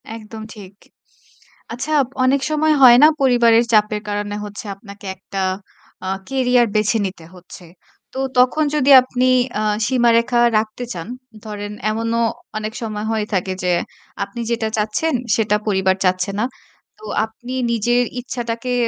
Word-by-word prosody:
একদম 220 Hz, 0 st, -10 dB
ঠিক। 200 Hz, -3 st, -12 dB, 1.0 s
আচ্ছা 270 Hz, +6 st, -4 dB, 0.3 s
অনেক 270 Hz, +1 st, +2 dB
সময় 310 Hz, 0 st, +2 dB
হয় 240 Hz, -1 st, +9 dB
না -, -, +10 dB
পরিবারের 240 Hz, -3 st, +4 dB
চাপের 210 Hz, 0 st, +3 dB
কারণে 205 Hz, 0 st, -3 dB
হচ্ছে 205 Hz, +1 st, -9 dB
আপনাকে 200 Hz, 0 st, -13 dB
একটা 195 Hz, +1 st, -6 dB, 0.6 s
আ -, -, -2 dB, 0.2 s
কেরিয়ার 250 Hz, -2 st, +2 dB
বেছে 215 Hz, +2 st, +2 dB
নিতে 185 Hz, -4 st, -7 dB
হচ্ছে। 180 Hz, 0 st, -13 dB, 0.5 s
তো 265 Hz, -, -5 dB, 0.2 s
তখন 255 Hz, +5 st, +3 dB
যদি 285 Hz, -1 st, +3 dB
আপনি 255 Hz, 0 st, -1 dB, 0.3 s
আ -, -, -1 dB, 0.2 s
সীমারেখা 240 Hz, -1 st, +3 dB, 0.2 s
রাখতে 215 Hz, +3 st, -3 dB
চান, 170 Hz, 0 st, -7 dB, 0.4 s
ধরেন 205 Hz, -1 st, -6 dB, 0.2 s
এমনও 230 Hz, +1 st, -1 dB
ও -, -, -6 dB, 0.2 s
অনেক 215 Hz, 0 st, -4 dB
সময় 215 Hz, -2 st, -4 dB
হয়ে 220 Hz, -1 st, -1 dB
থাকে 190 Hz, 0 st, -1 dB
যে 180 Hz, -1 st, +2 dB, 0.5 s
আপনি 200 Hz, +4 st, -7 dB
যেটা 230 Hz, -1 st, 0 dB
চাচ্ছেন, 215 Hz, +10 st, 0 dB, 0.2 s
সেটা 210 Hz, -2 st, +1 dB
পরিবার 190 Hz, -2 st, +2 dB
চাচ্ছে 185 Hz, +1 st, +1 dB
না। 220 Hz, -, +1 dB, 0.5 s
তো -, -, -12 dB, 0.2 s
আপনি 240 Hz, +3 st, -10 dB, 0.2 s
নিজের 240 Hz, +2 st, +2 dB, 0.2 s
ইচ্ছাটাকে 240 Hz, 0 st, -4 dB
225 Hz, 145 wpm, -19 LUFS, 205-245 Hz, 1.0 s, না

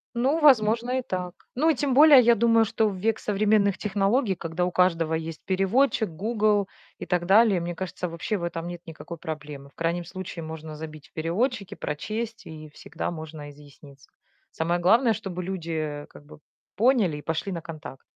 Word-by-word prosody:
Ну, 265 Hz, +7 st, +1 dB
возможно, 245 Hz, -3 st, +4 dB
и -, -, -2 dB
так. 180 Hz, -6 st, -4 dB, 0.2 s
Ну 305 Hz, +6 st, +3 dB
и 320 Hz, -, +3 dB
тем 275 Hz, 0 st, 0 dB
более, 290 Hz, 0 st, +8 dB
я 235 Hz, 0 st, +5 dB
думаю, 230 Hz, 0 st, +4 dB
что 220 Hz, +1 st, +1 dB
в 195 Hz, -, -5 dB
век 220 Hz, +4 st, 0 dB
современных 205 Hz, -1 st, +2 dB
технологий, 205 Hz, +2 st, +1 dB
когда 170 Hz, +1 st, -2 dB
у 180 Hz, -, -2 dB
каждого 165 Hz, -3 st, +2 dB
есть 160 Hz, 0 st, -4 dB
переводчик, 210 Hz, +5 st, +2 dB
"Гугл" 210 Hz, +3 st, +1 dB, 0.3 s
и -, -, -7 dB
так 175 Hz, 0 st, 0 dB
далее, 200 Hz, 0 st, +5 dB
мне 175 Hz, 0 st, -4 dB
кажется, 180 Hz, 0 st, -4 dB
вообще 170 Hz, +5 st, -3 dB
в 175 Hz, -, -6 dB
этом 170 Hz, 0 st, -4 dB
нет 175 Hz, -1 st, -7 dB
никакой 165 Hz, +1 st, -9 dB
проблемы. 150 Hz, -3 st, -7 dB
В -, -, -33 dB
крайнем 170 Hz, +1 st, -2 dB
случае, 175 Hz, -1 st, -7 dB
можно 160 Hz, -1 st, -7 dB
забить 155 Hz, -1 st, -9 dB
в -, -, -46 dB
переводчике, 200 Hz, +5 st, -2 dB
прочесть 220 Hz, +9 st, -5 dB
и 155 Hz, -1 st, -10 dB
всегда 155 Hz, +3 st, -6 dB
можно 155 Hz, -2 st, -8 dB
изъясниться. 140 Hz, -1 st, -16 dB, 0.4 s
Самое 170 Hz, +2 st, -1 dB
главное, 225 Hz, +6 st, +4 dB
чтобы 180 Hz, -3 st, -5 dB
люди 160 Hz, -5 st, -4 dB
как 145 Hz, -, -15 dB
бы 145 Hz, -, -14 dB, 0.4 s
поняли 225 Hz, -, +3 dB
и -, -, -8 dB
пошли 160 Hz, +6 st, -3 dB
на 170 Hz, -2 st, -4 dB
контакт. 155 Hz, -5 st, -9 dB
180 Hz, 180 wpm, -25 LUFS, 160-220 Hz, 0.4 s, более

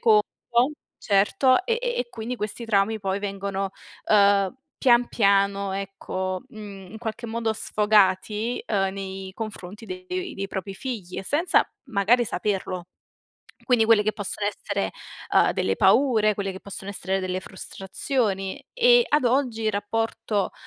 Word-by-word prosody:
conto 215 Hz, -2 st, +5 dB, 0.7 s
certo 255 Hz, -, +3 dB
e 465 Hz, +2 st, +1 dB
e -, -, -1 dB
e 245 Hz, -, -2 dB
quindi 230 Hz, +2 st, -5 dB
questi 215 Hz, +1 st, -4 dB
traumi 215 Hz, 0 st, +2 dB
poi 195 Hz, 0 st, -1 dB
vengono 195 Hz, -1 st, -3 dB, 0.4 s
uhm 200 Hz, -2 st, +5 dB, 0.3 s
pian 240 Hz, -2 st, +5 dB
piano, 200 Hz, -2 st, +2 dB
ecco, 190 Hz, -1 st, -4 dB
mhmm 200 Hz, -3 st, -10 dB
in 220 Hz, -, -8 dB
qualche 230 Hz, +1 st, -5 dB
modo 225 Hz, 0 st, -1 dB
sfogati 210 Hz, +2 st, +2 dB
uhm 195 Hz, -4 st, +1 dB
nei 190 Hz, -1 st, -6 dB
confronti 210 Hz, -1 st, -7 dB
dei 365 Hz, -1 st, -5 dB
dei 195 Hz, 0 st, -4 dB
propri 195 Hz, +1 st, -5 dB
figli 205 Hz, -6 st, -6 dB
e -, -, -4 dB
senza 300 Hz, -, +3 dB, 0.3 s
magari 220 Hz, +5 st, +3 dB
saperlo. 190 Hz, -5 st, -2 dB, 0.8 s
Quindi 245 Hz, -4 st, +4 dB
quelle 220 Hz, -2 st, +5 dB
che 215 Hz, -, +1 dB
possono 205 Hz, 0 st, 0 dB
essere 200 Hz, -1 st, -2 dB, 0.4 s
uhm -, -, +5 dB
delle -, -, 0 dB
paure, 220 Hz, -6 st, +4 dB
quelle 195 Hz, -1 st, -3 dB
che 190 Hz, -, -9 dB
possono 200 Hz, 0 st, -6 dB
essere 190 Hz, -1 st, -1 dB
delle 185 Hz, 0 st, -2 dB
frustrazioni 195 Hz, +1 st, -2 dB
e 485 Hz, 0 st, +5 dB
ad 295 Hz, -3 st, +2 dB
oggi 245 Hz, -2 st, +1 dB
il 215 Hz, -, +1 dB
rapporto 205 Hz, -1 st, -1 dB
210 Hz, 140 wpm, -25 LUFS, 195-235 Hz, 0.8 s, conto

